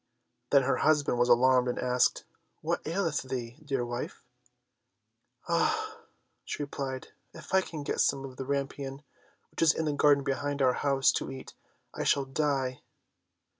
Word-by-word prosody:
Then 140 Hz, -1 st, +5 dB
her 135 Hz, -, +1 dB
husband 145 Hz, -5 st, +2 dB
was 120 Hz, 0 st, +3 dB
alarmed, 125 Hz, +1 st, +5 dB
and 125 Hz, -, -1 dB
asked, 125 Hz, 0 st, +2 dB, 0.4 s
"What -, -, -1 dB
aileth 165 Hz, -2 st, 0 dB
thee, 125 Hz, -2 st, -5 dB
dear 135 Hz, -4 st, -1 dB
wife?" 120 Hz, 0 st, -5 dB, 1.2 s
"Ah," -, -, 0 dB, 0.4 s
she 150 Hz, -, -4 dB
replied, 135 Hz, -2 st, -5 dB, 0.3 s
"if -, -, -11 dB
I 190 Hz, -, +6 dB
can't 155 Hz, -5 st, -7 dB
get -, -, 0 dB
some 135 Hz, -1 st, +1 dB
of 130 Hz, -2 st, -10 dB
the 135 Hz, -, -4 dB
rampion, 140 Hz, 0 st, -3 dB, 0.5 s
which -, -, -6 dB
is 165 Hz, -2 st, +5 dB
in 160 Hz, -, -1 dB
the 150 Hz, -, 0 dB
garden 145 Hz, -1 st, +4 dB
behind 145 Hz, +1 st, -2 dB
our 130 Hz, -2 st, +4 dB
house, 140 Hz, -1 st, +3 dB
to -, -, -3 dB
eat, 135 Hz, 0 st, -9 dB, 0.4 s
I -, -, -3 dB
shall 140 Hz, -1 st, +2 dB
die." 135 Hz, -2 st, -1 dB
135 Hz, 160 wpm, -29 LUFS, 130-145 Hz, 1.2 s, I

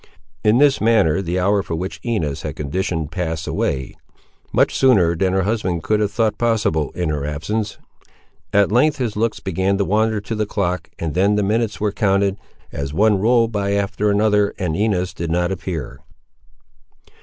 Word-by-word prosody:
In 105 Hz, +2 st, +4 dB
this 140 Hz, 0 st, +4 dB
manner 105 Hz, -7 st, +3 dB
the 90 Hz, -1 st, -2 dB
hour 100 Hz, +2 st, +2 dB
for 85 Hz, -4 st, -4 dB
which 90 Hz, +4 st, -5 dB
Inez 85 Hz, -, -2 dB
had -, -, -5 dB
conditioned 80 Hz, +1 st, -3 dB
passed 80 Hz, -4 st, -3 dB
away, 65 Hz, -1 st, -2 dB, 0.6 s
much -, -, +2 dB
sooner 95 Hz, -11 st, +4 dB
than 95 Hz, +2 st, +1 dB
her 95 Hz, 0 st, +2 dB
husband 95 Hz, -5 st, -1 dB
could 105 Hz, -1 st, +1 dB
have 105 Hz, -1 st, 0 dB
thought 110 Hz, -1 st, 0 dB
possible, 105 Hz, -, +1 dB
in 90 Hz, -3 st, -1 dB
her 75 Hz, -2 st, -2 dB
absence. 100 Hz, +9 st, -3 dB, 0.7 s
At 100 Hz, -1 st, +3 dB
length 145 Hz, +7 st, +3 dB
his 120 Hz, -5 st, -2 dB
looks 115 Hz, +1 st, -1 dB
began 95 Hz, +1 st, 0 dB
to 100 Hz, -, 0 dB
wander 110 Hz, +2 st, +1 dB
to 105 Hz, +3 st, -5 dB
the 105 Hz, -1 st, -1 dB
clock, 90 Hz, -3 st, -2 dB
and 80 Hz, -3 st, -3 dB
then 100 Hz, +3 st, +2 dB
the 105 Hz, -, +1 dB
minutes 110 Hz, +2 st, 0 dB
were 105 Hz, -1 st, 0 dB
counted, 100 Hz, -1 st, +1 dB, 0.3 s
as 70 Hz, +1 st, -5 dB
one 105 Hz, +1 st, +3 dB
rolled 115 Hz, +1 st, +3 dB
by 100 Hz, -2 st, -1 dB
after 100 Hz, +1 st, 0 dB
another 105 Hz, 0 st, +2 dB
and 90 Hz, -5 st, -2 dB
Inez 95 Hz, -2 st, 0 dB
did 85 Hz, -1 st, -4 dB
not 90 Hz, +2 st, 0 dB
appear. 85 Hz, -6 st, -5 dB
100 Hz, 180 wpm, -20 LUFS, 85-110 Hz, 0.7 s, In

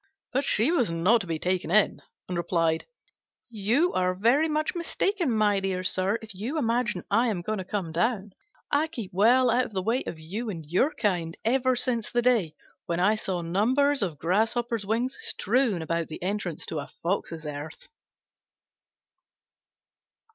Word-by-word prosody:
But 270 Hz, +3 st, +1 dB
she 250 Hz, +2 st, +3 dB
was 260 Hz, -, +2 dB
not 180 Hz, +8 st, +3 dB
to 180 Hz, -, -7 dB
be 165 Hz, -1 st, -1 dB
taken 180 Hz, +2 st, -1 dB
in, 210 Hz, +3 st, +3 dB, 0.3 s
and 180 Hz, -, -4 dB
replied, 165 Hz, -2 st, 0 dB, 0.6 s
"You 230 Hz, -, +1 dB
are 185 Hz, 0 st, +1 dB
very 245 Hz, +11 st, +3 dB
much 305 Hz, 0 st, 0 dB
mistaken, 355 Hz, 0 st, -1 dB
my 210 Hz, -3 st, +2 dB
dear 190 Hz, -1 st, -2 dB
sir, 185 Hz, +3 st, +1 dB
if 220 Hz, -2 st, -9 dB
you 225 Hz, -, -4 dB
imagine 235 Hz, -, 0 dB
I 230 Hz, +5 st, +3 dB
am 190 Hz, -6 st, -2 dB
going 215 Hz, +2 st, -2 dB
to -, -, -3 dB
come 185 Hz, -3 st, -3 dB
down: 205 Hz, +4 st, 0 dB, 0.4 s
I 290 Hz, +2 st, +2 dB
keep 235 Hz, -, -7 dB
well 240 Hz, +6 st, +4 dB
out 250 Hz, +2 st, +2 dB
of 220 Hz, -, -10 dB
the 190 Hz, -1 st, -2 dB
way 230 Hz, +6 st, +1 dB
of 165 Hz, -, -5 dB
you 200 Hz, +9 st, -5 dB
and 165 Hz, -6 st, -6 dB
your 180 Hz, -, +2 dB
kind 180 Hz, -, -1 dB
ever 255 Hz, +2 st, +2 dB
since 240 Hz, -3 st, 0 dB
the 240 Hz, 0 st, +1 dB
day 225 Hz, -11 st, +2 dB, 0.3 s
when 170 Hz, 0 st, -1 dB
I 195 Hz, +4 st, +4 dB
saw 185 Hz, -5 st, -3 dB
numbers 255 Hz, +11 st, +2 dB
of 175 Hz, -7 st, -2 dB
grasshoppers' 220 Hz, -, 0 dB
wings 240 Hz, +5 st, 0 dB
strewn 250 Hz, -, +1 dB
about 165 Hz, 0 st, -1 dB
the 155 Hz, -, -8 dB
entrance 185 Hz, -4 st, -3 dB
to 160 Hz, -, -4 dB
a 145 Hz, -, -6 dB
fox's 170 Hz, -3 st, -3 dB
earth." 150 Hz, +1 st, -7 dB
210 Hz, 170 wpm, -27 LUFS, 175-245 Hz, 0.6 s, well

